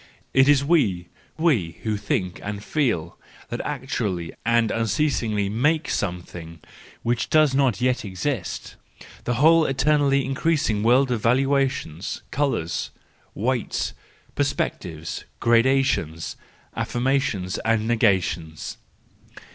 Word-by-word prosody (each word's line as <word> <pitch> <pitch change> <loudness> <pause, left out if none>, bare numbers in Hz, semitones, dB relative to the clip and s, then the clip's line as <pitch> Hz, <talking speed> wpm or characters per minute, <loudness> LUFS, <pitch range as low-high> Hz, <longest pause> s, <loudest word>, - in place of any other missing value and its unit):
It 135 0 +5
is 140 -1 +4
we, 100 - +2 0.3
we 125 - +1
who 110 -1 0
think 90 -3 -2
and 100 0 -5
feel, 110 - -1 0.3
that - - -3
actually 90 -5 -3
and 115 0 +2
unceasingly 115 -2 0
make 145 +10 +1
something 85 -3 -4 0.4
which 120 -1 0
does 155 -3 +4
not 135 -4 +2
yet 125 0 +1
exist: 100 - -4 0.5
the 120 - 0
whole 160 +5 +6
eternally 140 0 +2
increasing 135 -5 0
world 125 +4 +4
of 120 -3 0
valuations, 130 - 0
colours, 135 - -1 0.5
weights, 120 +3 -1 0.4
perspectives, 80 -1 -2 0.2
gradations, 115 - +2 0.4
affirmations 120 -7 -1
and 110 -1 +1
negations. 95 -8 0
115 Hz, 100 wpm, -24 LUFS, 95-135 Hz, 0.5 s, whole